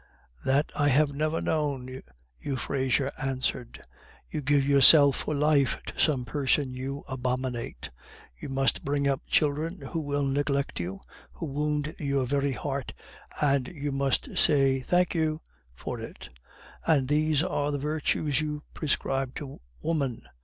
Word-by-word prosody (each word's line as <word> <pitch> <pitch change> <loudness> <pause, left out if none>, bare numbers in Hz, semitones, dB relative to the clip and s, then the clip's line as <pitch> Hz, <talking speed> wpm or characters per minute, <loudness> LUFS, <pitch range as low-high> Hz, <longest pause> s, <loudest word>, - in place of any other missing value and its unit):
"That 140 +3 +2
I 145 - +2
have 145 +2 +3
never 155 +3 -1
known!" 135 -4 -2 0.4
Euphrasia 135 0 -1
answered. 130 -2 -3 0.5
"You 155 - -3
give 140 0 +2
yourself 140 0 +7
for 155 - -2
life 145 -1 +3
to - - -8
some 135 -4 +2
person 135 +1 +1
you 135 +2 -5
abominate; 125 -2 -3 0.4
you - - -8
must 135 0 +1
bring 140 0 0
up 135 -1 0
children 155 +5 0
who 165 - -4
will 145 -2 -1
neglect 140 0 -1
you, 90 +2 -5 0.3
who 65 - -6
wound 150 +1 -2
your 140 -3 0
very 140 +1 0
heart, 135 +1 -4 0.5
and 140 -3 +2
you 145 -3 -4
must 135 -1 0
say, 135 -3 +4
'Thank 180 +7 +1
you!' 160 -2 0 0.4
for - - -5
it; - - -9 0.5
and 145 -5 +2
these 155 +1 +2
are 145 -4 -1
the 145 - -1
virtues 150 0 0
you 150 -1 -4
prescribe 135 -3 -1
to 140 - -8 0.2
woman. 140 -8 -1
140 Hz, 140 wpm, -27 LUFS, 135-150 Hz, 0.5 s, yourself